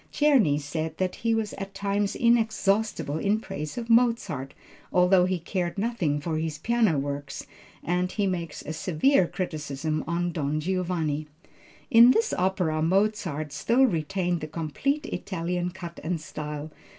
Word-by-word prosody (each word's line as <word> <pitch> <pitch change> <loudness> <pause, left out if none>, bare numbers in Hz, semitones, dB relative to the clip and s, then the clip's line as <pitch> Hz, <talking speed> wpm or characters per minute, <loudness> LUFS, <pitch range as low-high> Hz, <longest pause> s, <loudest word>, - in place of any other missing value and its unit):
Czerny 255 - +4
said 155 +2 -4
that 185 -1 -1
he 230 -1 +1
was 220 -2 -2
at 195 0 -6
times 200 0 -1
inexhaustible 215 -8 +1
in 205 +4 +1
praise 150 -6 -6
of 235 -1 -4
Mozart, 230 - +2 0.4
although 180 0 +5
he 185 0 0
cared 175 +2 -3
nothing 195 -9 0
for 155 +1 -2
his 160 -2 -3
piano 220 -2 +2
works 140 0 -4 0.4
and 180 +1 0
he 205 - 0
makes 170 -5 -3
a 155 - -5
severe 180 - +2
criticism 155 -3 -3
on 175 +1 -1
Don 155 -2 -1
Giovanni. 165 -3 -1 0.6
"In 235 0 +9
this 450 - +3
opera 180 -4 0
Mozart 180 -4 0
still 235 - +2
retained 175 - -1
the 155 - -4
complete 170 - -2
Italian 180 - -3
cut 175 -2 -8
and 170 +1 -1
style. 150 0 -6
180 Hz, 145 wpm, -26 LUFS, 155-205 Hz, 0.6 s, In